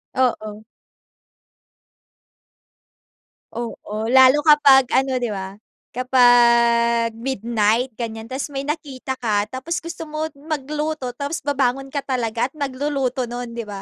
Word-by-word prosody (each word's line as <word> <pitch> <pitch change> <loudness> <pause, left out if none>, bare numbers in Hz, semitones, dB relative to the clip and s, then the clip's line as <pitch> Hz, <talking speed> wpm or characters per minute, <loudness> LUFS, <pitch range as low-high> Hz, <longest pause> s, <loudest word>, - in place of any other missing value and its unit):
Oo. 215 -4 -1 2.9
Oo. 225 -1 -5
Lalo 260 +3 +6
kapag 280 -4 +6
ano 260 -1 +1
'di 240 - -1
ba? 195 -1 -5 0.4
Kapag 235 -2 +4
midnight, 230 0 0
ganyan, 225 -1 -6
tapos 270 +4 -5
may 275 +1 -5
nakita 280 -4 -4
ka, 210 -4 -1
tapos 265 +7 -4
gusto 335 0 -7
mo 310 0 -4
magluto, 300 -1 -4
tapos 285 +4 -3
babangon 270 -1 -1
ka 280 0 -4
talaga 240 -2 -1
at - - -49
magluluto 270 -2 -2
no'n, 240 -1 -6
'di 235 - -4
ba? 205 -2 -8
255 Hz, 115 wpm, -21 LUFS, 235-280 Hz, 2.9 s, Lalo